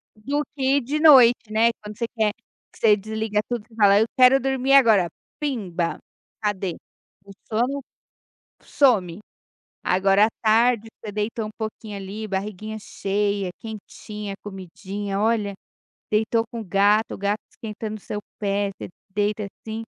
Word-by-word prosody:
Do 285 +8 -2
que 270 +1 +2
de 285 +4 -2
noite, 245 -7 +7
né. 225 +2 +4
Quando 210 0 -9
você 235 - -1
quer, 215 -2 +1
que 230 - -26
você 215 -2 +5
desliga 215 0 -2
tudo, 240 -3 -2
que 225 - -20
fala: 205 -2 +5
"Eu 220 - +4
quero 255 +1 +7
dormir 265 +1 +1
agora, 220 -10 +6 0.3
pimba", 195 - -2 0.4
cadê? 195 -4 -1 0.5
O 200 - -12 0.2
sono 250 +5 0 0.8
some. 205 - +2 0.6
Agora, 195 +3 +4
à - - -4
tarde, 225 0 +3
você 210 - -6
deitou 215 +2 -2
um - - -7
pouquinho 215 -1 -6
ali, 205 +3 -6
barriguinha 210 +2 -4
cheia, 200 -1 -1
quentinha, 210 -2 -7
comidinha, 195 +1 -5
olha. 215 -2 +1 0.6
Deitou 220 +2 +2
com 235 - -5
o - - -6
gato, 205 +3 +2
o - - -9
gato 200 +2 -1
esquentando 215 -1 -6
o - - -12
seu 210 - -4 0.2
pé, 200 -1 0
você - - -6 0.2
deita 205 0 0 0.2
assim 220 +1 -4
215 Hz, 145 wpm, -23 LUFS, 200-230 Hz, 0.8 s, noite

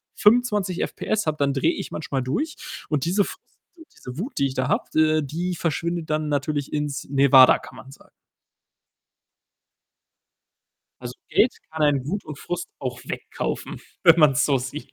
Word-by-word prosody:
25 210 -5 +2
FPS 215 -5 -2
habe, 155 - 0
dann 140 -1 +1
drehe 135 - +1
ich - - -6
manchmal 140 -4 -3
durch, 295 - -2 0.3
und 150 -4 0
diese 190 +4 +2
Frust - - -8 0.4
und 325 - -15
diese 125 +2 -9
Wut, 235 - -4
die 140 - +2
ich 130 - -4
da 130 0 -1
habe, - - +1
äh, 155 0 +4
die 170 +5 -3
verschwindet 170 +1 -2
dann 155 0 0
natürlich 145 0 -2
ins 150 -1 -2
Nevada, 135 -1 +6
kann - - -13
man 135 - -12
sagen. - - -17 2.9
Also, - - -7 0.2
Geld - - +3 0.2
kann 160 -1 -3
einen 140 -3 +2
Wut 200 +6 -3
und 150 -2 -8
Frust 175 0 -5
auch 125 -2 -5
wegkaufen, - - -5 0.2
wenn 165 0 +7
man's 145 -5 +5
so 140 -2 +2
sieht. 130 +4 -7
150 Hz, 165 wpm, -23 LUFS, 140-175 Hz, 2.9 s, wenn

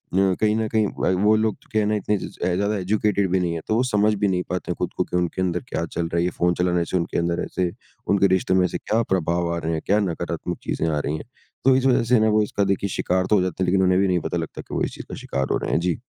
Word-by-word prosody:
कहीं 95 +3 +2
न 110 -1 0
कहीं 110 -2 +3
व 90 - +2
वो 110 +1 +5
लोग 110 -2 +1
जो - - -27
क्या 110 - +2
है 105 - 0
ना 105 - +1
इतने 105 0 0
ज़ - - -5
ज़ - - -16
अ, 90 - +1
ज़्यादा 100 +3 0
एजुकेटेड 100 0 +1
भी 95 - +3
नहीं 85 -2 -1
है। 80 - -4
तो 110 - +1
वो 120 - +3
समझ 105 +1 +3
भी - - +5
नहीं 90 -2 0
पाते 90 -1 -3
हैं - - -2
खुद - - -2
को - - +2
कि 90 - -3
उनके 90 +1 -1
अंदर 90 -1 0
क्या 85 - -2
चल 85 0 -3
रहा 85 - -3
है? 85 - +2
ये 90 - +1
फ़ोन 90 0 +1
चलाना 90 -1 +2
से 90 - -1
उनके 85 - -2
अंदर 85 0 -1
ऐसे 90 -2 -2 0.4
उनके 100 -1 +4
रिश्ते 95 - 0
में 95 -1 +4
ऐसे 90 - -2
क्या 110 +2 0
प्रभाव 85 -1 0
आ - - -3
रहे 80 0 -2
हैं? 80 - -2
क्या 105 +2 +3
नकारात्मक 90 -5 -3
चीज़ें 80 - -1
आ 75 -2 0
रही 75 +1 -2
हैं? - - -9 0.4
तो 135 -1 +6
इस 130 0 +1
वज़ह 125 -3 +4
से 120 - +6
ना 110 0 +3
वो 110 0 +3
इसका 105 0 -1
देखिए 100 +1 -3
शिकार 90 0 0
तो 105 - +5
हो 95 - +3
जाता 95 0 -1
है, - - +2
लेकिन 95 +1 +2
उन्हें 95 0 +3
भी 100 - +3
नहीं 90 -1 +2
पता - - -3
लगता - - -5
कि - - -12
वो - - 0
इस - - -2
चीज़ - - -9
का - - -5
शिकार 65 -1 -1
हो - - +2
रहे - - -3
हैं। - - +2
जी। 90 +4 -1
95 Hz, 320 wpm, -23 LUFS, 85-105 Hz, 0.4 s, तो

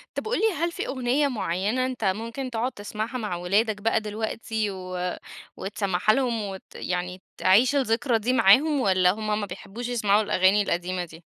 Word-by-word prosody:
طب - - -3
قل 470 - 0
لي - - +2
هل 340 +3 0
في - - -4
أغنية 265 +2 +1
معينة 215 +1 -1
أنت 255 -3 -4
ممكن 230 +7 -2
تقعد 235 +2 -1
تسمعها 215 +3 -5
مع 210 -7 -3
ولادك 205 +5 0
بقى 225 +1 +2
دلوقتي، 220 0 -3
و 185 -1 -4 0.4
وتسمعها 195 0 0
لهم 245 -3 0
وت 195 -2 -6
يعني 180 +1 -3 0.2
تعيش 235 +9 +4
الذكرى 245 -2 +1
دي 240 +4 0
معاهم، 275 +7 +5
والَّا 185 -4 +4
همَّ 215 0 -2
ما 205 - -2
بيحبوش 200 +5 -7
يسمعوا 215 -4 +2
الأغاني 205 -1 +3
القديمة 180 -1 -2
دي؟ 165 0 -14
215 Hz, 170 wpm, -25 LUFS, 190-245 Hz, 0.4 s, معاهم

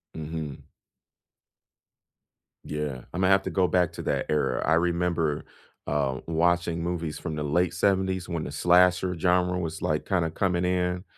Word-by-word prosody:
Mhm. 80 -2 -6 2.0
Yeah, 75 -4 -4
Imma 95 +1 +1
have 95 0 +4
to - - -3
go 95 -1 +2
back 90 -2 +1
to - - -6
that - - -1
era. 75 -1 +1
I 80 - +3
remember, 85 -3 0 0.4
uh, 70 -3 0
watching 85 0 +1
movies 85 -3 -3
from 80 -3 -5
the 75 - -3
late 85 +5 +1
'70s 95 -1 +1
when 85 -3 -2
the - - -5
slasher 90 +3 +3
genre 90 +1 +2
was, 80 -2 -4
like, 75 0 -1
kinda 85 -4 +1
coming 90 0 0
in 90 0 0
85 Hz, 150 wpm, -26 LUFS, 80-90 Hz, 2.0 s, have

